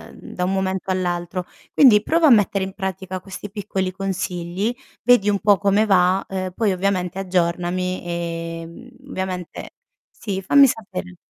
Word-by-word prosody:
mhmm, - - -12
da 180 - -3
un 190 - 0
momento 190 0 -1
all'altro. 180 0 -2 0.3
Quindi 235 -7 +7
prova 330 +4 +3
a - - +7
mettere 205 -4 +4
in 190 0 -5
pratica 190 -1 -4
questi 195 +2 -9
piccoli 195 -2 -3
consigli, 185 +2 -3 0.3
vedi 225 -4 +4
un 200 -1 +1
po' 205 -1 +4
come 200 +2 +2
va, 185 -1 +3
uhm, 185 -1 -3
poi 215 -4 +1
ovviamente 185 -1 -1
aggiornami, 180 0 -1
e 165 -1 -4
mhmm, 205 +10 -12 0.2
ovviamente 185 -2 -5 0.4
sì, 195 -3 -5
fammi 275 +8 +6
sapere. 190 -6 -5
190 Hz, 155 wpm, -21 LUFS, 180-200 Hz, 0.4 s, Quindi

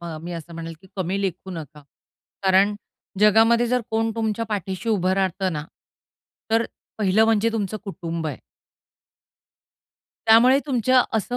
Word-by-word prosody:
अ, 170 -2 -6
मी 175 +1 -6
असं 170 0 -8
म्हणेल, 165 0 -6
की 190 - -18
कमी 190 +2 -1
लेखू 190 0 -3
नका. 150 -4 -8 0.6
कारण 195 +2 +4 0.5
जगामध्ये 225 +3 +5
जर 250 +1 +1
कोण 225 0 +1
तुमच्या 225 0 -1
पाठीशी 195 0 -3
उभं 190 -4 +2
राहतं 190 0 0
ना, 150 -1 -4 0.9
तर 225 +1 +3 0.3
पहिलं 210 +2 +3
म्हणजे 225 0 +2
तुमचं 215 -2 -2
कुटुंब 170 -4 -5
आहे. 145 -4 -4 1.9
त्यामुळे 240 +5 +6
तुमच्या 255 -1 +3
असं 245 +3 -2
200 Hz, 135 wpm, -23 LUFS, 175-225 Hz, 1.9 s, त्यामुळे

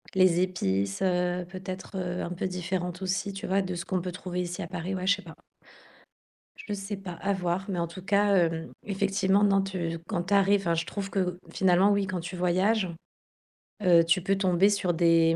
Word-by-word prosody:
Les 185 -2 +4
épices, 100 - -1
heu, 180 -1 +1
peut-être, 185 +1 -7
heu, 180 -1 -2
un 170 - -4
peu 180 - -3
différentes 180 0 -3
aussi, 190 +2 -1
tu 195 - -6
vois, 195 +1 +2
de 185 -1 -4
ce 170 - -5
qu'on 185 -1 -1
peut 180 +1 -4
trouver 180 0 -4
ici 175 0 -4
à - - -4
Paris. 180 +2 -4
Ouais, 185 0 -3
je 200 - +5
sais 200 - -11
pas. 170 -4 -11 1.2
Je 210 - -6
sais 200 0 -4
pas, 190 -2 -7
à 195 +4 -1
voir, 180 0 -1
mais 180 -3 -1
en 170 - 0
tout 170 +3 -10
cas, 200 +1 +3
hem, 165 -3 +1 0.2
effectivement, 195 0 +1
non, 195 -1 +4
tu 175 -4 -3
quand 175 -5 -1
tu 190 +3 -2
arrives 200 0 +4
enfin, 170 -3 +1
je 165 0 -1
trouve 195 +2 -5
que, 180 -3 -1
finalement, 190 +1 +4
oui, 200 -1 +1
quand 185 -1 -2
tu 175 +2 -6
voyages, 185 +3 +2 0.9
heu, 170 -3 +6
tu 170 +2 +2
peux 195 +2 +1
tomber 190 0 +3
sur 200 -4 +1
des, 165 -1 +4
185 Hz, 210 wpm, -28 LUFS, 175-195 Hz, 1.2 s, heu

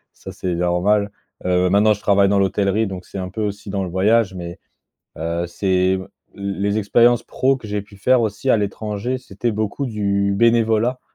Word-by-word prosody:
Ça, - - -10
c'est 90 -1 -3
normal, 90 +4 +1 0.4
heu, 90 0 +2
maintenant, 105 +2 +4
je 100 - -8
travaille 100 -1 +3
dans 100 - +2
l'hôtellerie, 100 +2 +1
donc 95 -2 -6
c'est - - -9
un 90 -1 -4
peu 110 +4 -5
aussi 100 0 -4
dans 100 -1 -1
le 90 - -4
voyage, 100 +3 +2
mais, 85 -1 -7 0.6
heu, 85 +2 -2
c'est, 95 +1 +1
l 95 - -9 0.3
les 100 +1 -2
expériences 120 +3 +4
pro 135 +1 +1
que 115 - -10
j'ai 105 0 -2
pu 105 0 -17
faire 125 +6 +3
aussi 110 +3 -2
à 115 - +5
l'étranger, 105 +4 -3
c'était 120 -1 -3
beaucoup 110 +6 -2
du 100 -3 0
bénévolat. 115 +2 +2
100 Hz, 190 wpm, -20 LUFS, 95-110 Hz, 0.6 s, à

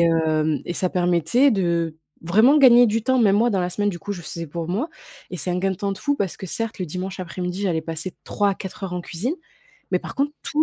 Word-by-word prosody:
hem, 160 -2 +2
et 175 - -3
ça 185 +1 0
permettait 180 - +3
de, 170 -6 0 0.2
vraiment 220 - +5
gagner 245 -3 +8
du 225 +1 0
temps. 260 +2 +2
Même 205 -4 +4
moi 235 +3 +3
dans 195 -4 +1
la 180 - -1
semaine 205 +3 0
du 175 -4 -3
coup, 205 +2 -5
je 180 - -6
faisais 170 0 -6
pour 165 +2 -5
moi 225 - -1 0.4
et 180 - -5
c'est 180 - -2
un 180 - 0
gain 195 +1 +1
de 190 - -3
temps 200 +2 -2
de 195 - -7
fou 285 -1 0
parce 195 -7 -2
que 190 - -7
certes 225 +5 -2
le 185 - -2
dimanche 185 +4 -5
après-midi 180 +1 -4
j'allais 175 -5 +1
passer 165 +3 -3
3 205 -1 +1
à - - -2
4 190 +1 -7
heures 180 - -5
en 180 - -2
cuisine, 195 - -3 0.6
mais - - +2
par - - -8
contre 285 +2 0
tous 305 +1 +1
185 Hz, 260 wpm, -23 LUFS, 170-220 Hz, 0.6 s, gagner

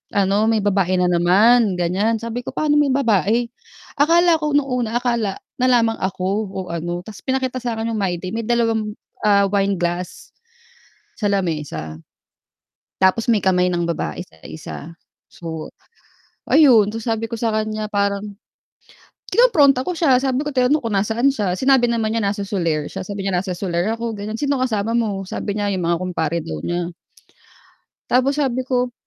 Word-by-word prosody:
ano, 200 +2 +2
may 220 -2 +1
babae 195 -2 +1
na 180 - +3
naman 200 +5 +4
ganyan. 195 +6 +1
Sabi 230 +2 -5
ko, - - -6
"Paanong 295 -1 +2
may 285 -3 +2
babae?" 235 -2 +2 0.5
Akala 335 +3 +5
ko 300 -1 -1
nung 290 -2 +2
una 240 -2 -1
akala 235 -5 -1 0.2
nalamang 240 -3 +2
ako 185 -1 -2 0.2
o 195 - -5
ano 175 +1 -3
tas 210 +1 -11
pinakita 260 -1 -1
sa'kin 230 -2 -3
yung 220 - -2
my 190 -3 0
day, 185 0 -6
may 230 +2 -3
dalawang, 225 -2 0 0.3
ah, 200 -1 +4
wine 200 0 +1
glass 175 +1 -1 1.1
sa 205 -2 0
lamesa. 150 - -3 1.0
Tapos 205 +5 +2
may 225 - +4
kamay 180 -1 +2
ng 175 -1 -1
babae 80 - -3
sa 80 - -23
isa 155 - -8 0.5
so, 160 -2 -7 0.8
ayun. 250 -10 +6
Tas 225 - -4
sabi 225 -1 -1
ko 230 - -6
sa 230 0 -1
kan'ya 215 0 -2
parang, 200 -1 0 1.1
kinompronta 290 - +4
ko 315 - -3
siya 280 -7 +3
sabi 270 +2 -1
ko, 295 - -3
tinanong 255 +3 +3
ko 240 - -7
kung 220 - -2
nasaan 220 +6 +2
siya, 190 -7 -1
sinabi 260 -3 +3
naman 225 -2 0
niya 230 - 0
nasa 200 0 -2
Solaire 165 -7 -1
siya, 190 - -6
sabi 195 +1 -5
niya, 195 - 0
"Nasa 185 +1 -1
Solaire 175 +1 -1
ako", 230 -1 -3
gan'yan, 210 +2 -5
sino 285 +1 0
kasama 225 -3 -1
mo? 205 -5 -1
sabi 205 +2 -4
niya, 205 -1 0
yung 185 - -2
mga 170 0 +1
kumpare 170 -3 -2
daw 80 - -5
niya. 175 - -3 1.2
Tapos 260 +3 +2
sabi 260 -3 0
ko 250 -1 -1
215 Hz, 170 wpm, -20 LUFS, 185-245 Hz, 1.2 s, ayun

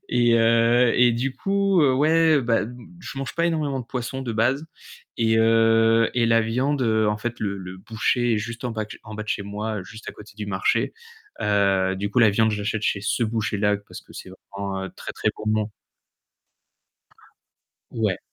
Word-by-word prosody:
et 120 -1 +3
heu, 115 +1 +4
et 120 -1 +5
du 130 +3 -2
coup, 195 +3 +1
heu, 135 -2 +4
ouais, 155 +1 +4
bah, 115 -1 +2 0.4
je 135 - -8
mange 135 - -5
pas 170 0 +1
énormément 150 -5 -1
de 120 - -8
poissons 130 +2 -4
de 120 -3 -4
base 130 +8 0 0.5
et 110 -1 +2
heu, 115 0 +4
et 120 -2 +2
la 115 0 +4
viande, 130 +5 0
heu, 110 -2 +2
en 105 - 0
fait 120 +2 -4
le 100 -2 -3
le 95 0 -8
boucher 115 +3 0
est - - 0
juste 115 +3 -6
en 125 - -1
bas 110 -1 -3
de - - -25
ch - - -10
en 110 - -9
bas 110 - -5
de 105 - -13
chez 100 - -1
moi, 105 0 -4
juste 110 +2 -11
à - - -5
côté 105 -1 -14
du 105 -1 -5
marché, 95 -1 0 0.5
heu, 100 -2 +2
du 100 +1 -3
coup, 125 - +1
la 110 -3 +6
viande 110 +2 +2
je 105 - -2
l'achète 110 +1 -2
chez 100 - 0
ce 105 +4 -1
boucher-là 105 -2 0
parce 100 - -12
que - - -18
c'est 95 - -9 0.2
vraiment 95 -1 -4
très, - - -7
très - - -1 0.2
bon. 110 0 0 2.2
Ouais. 105 -5 -1
115 Hz, 200 wpm, -23 LUFS, 105-125 Hz, 2.2 s, la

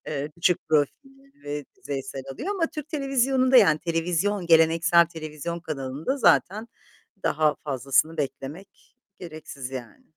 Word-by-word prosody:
eee, 145 0 -3
küçük 170 -1 0
profilleri 270 - -2
ve 145 0 -4
yüzeysel 135 -1 -6
alıyor 280 - -6
ama 345 -4 +1
Türk 305 -2 -8
televizyonunda, 270 -3 +2
yani, 160 -10 +6
televizyon 175 +3 -1
geleneksel 165 +1 +5
televizyon 160 +1 -6
kanalında 150 - -3
zaten 215 -1 +3 0.5
daha 150 0 +2
fazlasını 135 +3 +1
beklemek 145 +6 -7 0.2
gereksiz, 155 -6 -8
yani. 125 -4 -8
165 Hz, 120 wpm, -25 LUFS, 145-220 Hz, 0.5 s, yani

